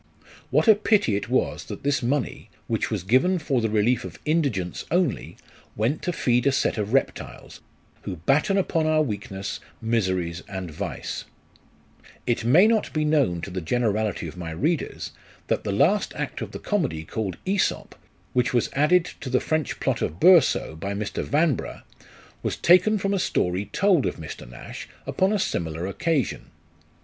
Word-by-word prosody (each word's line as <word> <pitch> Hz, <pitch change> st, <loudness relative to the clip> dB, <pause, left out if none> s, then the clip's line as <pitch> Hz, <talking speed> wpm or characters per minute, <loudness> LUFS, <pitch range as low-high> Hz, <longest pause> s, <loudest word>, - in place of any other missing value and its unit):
What -, -, +2 dB
a 220 Hz, -, +10 dB
pity 210 Hz, -, +2 dB
it 100 Hz, -, -3 dB
was 130 Hz, -, 0 dB
that -, -, -8 dB
this 145 Hz, 0 st, +1 dB
money, 130 Hz, +3 st, -2 dB, 0.2 s
which -, -, -1 dB
was -, -, -2 dB
given 130 Hz, -, +3 dB
for 140 Hz, -6 st, 0 dB
the 110 Hz, -, 0 dB
relief 110 Hz, +3 st, +2 dB
of -, -, -8 dB
indigence 140 Hz, -, 0 dB
only, 175 Hz, -5 st, 0 dB, 0.4 s
went 115 Hz, +8 st, 0 dB
to 180 Hz, -, -1 dB
feed 125 Hz, -5 st, +1 dB
a -, -, +5 dB
set 130 Hz, -, 0 dB
of 105 Hz, 0 st, -2 dB
reptiles, 135 Hz, +1 st, -2 dB, 0.4 s
who -, -, -5 dB
batten 140 Hz, -, +2 dB
upon 165 Hz, -4 st, +1 dB
our 155 Hz, 0 st, +3 dB
weakness, 100 Hz, -5 st, -4 dB, 0.2 s
miseries, 95 Hz, -7 st, -1 dB
and 95 Hz, -4 st, -5 dB
vice! 75 Hz, -, -5 dB, 1.0 s
It 120 Hz, -2 st, 0 dB
may 150 Hz, -, +6 dB
not 220 Hz, -1 st, +2 dB
be 155 Hz, -1 st, +1 dB
known 140 Hz, -, +2 dB
to 95 Hz, -, -6 dB
the 90 Hz, 0 st, -3 dB
generality 110 Hz, +2 st, 0 dB
of -, -, -9 dB
my 85 Hz, -2 st, -6 dB
readers, 145 Hz, -, -2 dB, 0.4 s
that -, -, 0 dB
the 105 Hz, -, -2 dB
last 160 Hz, -, +2 dB
act -, -, -4 dB
of -, -, -4 dB
the -, -, -6 dB
comedy, 155 Hz, -, -1 dB
called 95 Hz, -1 st, -3 dB
" -, -, -35 dB
^iEsop," 190 Hz, 0 st, 0 dB, 0.4 s
which 125 Hz, 0 st, +1 dB
was 120 Hz, -, +1 dB
added 165 Hz, +5 st, +4 dB
to 130 Hz, -, -6 dB
the 130 Hz, 0 st, +3 dB
French 155 Hz, -1 st, -1 dB
plot -, -, 0 dB
of 80 Hz, +4 st, -2 dB
Boursault, 165 Hz, -, +5 dB
by 100 Hz, +4 st, -3 dB
Mr. 105 Hz, 0 st, -3 dB
Yanbrugh, 150 Hz, -2 st, 0 dB, 0.6 s
was -, -, -2 dB
taken 185 Hz, +5 st, +5 dB
from 195 Hz, 0 st, -1 dB
a 195 Hz, -, +1 dB
story 90 Hz, -, 0 dB
told 190 Hz, -, +2 dB
of -, -, -2 dB
Mr. -, -, -9 dB
Nash -, -, -9 dB, 0.2 s
upon 190 Hz, +2 st, +1 dB
a 215 Hz, -, +2 dB
similar 85 Hz, -, -2 dB
occasion. 150 Hz, -, -1 dB
125 Hz, 175 wpm, -25 LUFS, 100-165 Hz, 1.0 s, a